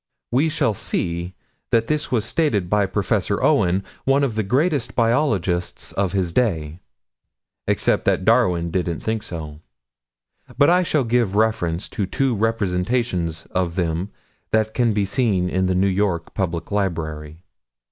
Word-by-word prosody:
We 140 +7 +2
shall 150 -8 +1
see 85 -1 -2 0.3
that 115 -1 +2
this 150 +3 -1
was 115 -4 +1
stated 115 - 0
by 105 -1 +3
Prof. 95 +1 -1
Owen, 90 +3 +2 0.2
one 135 +1 +3
of 130 -5 0
the 110 - 0
greatest 135 - 0
biologists 115 - 0
of 95 -2 -1
his 90 -3 -1
day 85 -9 0 0.9
except - - +1
that 95 - +1
Darwin 90 -8 +3
didn't 85 -2 -2
think 110 0 -2
so. 80 -7 -7 1.0
But 145 +4 +5
I 180 +1 +4
shall 155 -5 +1
give 115 -4 +1
reference 100 -5 0
to 100 - -3
two 135 +2 0
representations 95 -4 -1
of 90 -2 -1
them 85 +1 -1 0.4
that 110 0 +1
can 120 -3 +2
be 105 -1 +1
seen 100 -3 +1
in 95 +1 0
the 95 - +1
New 95 +2 +3
York 95 -3 0
Public 85 -2 -3
Library. 80 -5 -3
100 Hz, 145 wpm, -22 LUFS, 90-115 Hz, 1.0 s, But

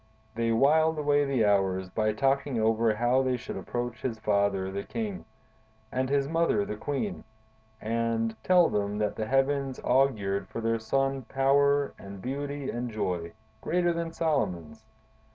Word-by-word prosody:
They 115 0 0
whiled 155 +7 +3
away 145 -1 +2
the 130 -5 +1
hours 95 -2 +1
by 110 +2 0
talking 135 0 +1
over 110 0 +2
how 120 +3 +2
they 130 -1 0
should 125 - -7
approach 120 0 -4
his 120 -4 -2
father, 100 -3 0
the 100 +1 -3
king, 210 - -5 0.7
and 130 +1 -1
his 140 -1 +1
mother, 165 -10 +1
the 105 - -4
queen, 145 - -3 0.6
and 115 0 -1
tell 180 -2 +5
them 105 0 -1
that 105 -1 -1
the 110 - -3
heavens 135 0 +1
augured 105 -8 +1
for - - -6
their 115 0 0
son 135 +4 0
power 140 +1 +3
and 100 0 -9
beauty 140 +4 -4
and 120 +1 -3
joy, 90 -6 -3 0.3
greater 175 0 +1
than 170 -1 -3
Solomon's. 115 - -2
120 Hz, 155 wpm, -28 LUFS, 110-140 Hz, 0.7 s, tell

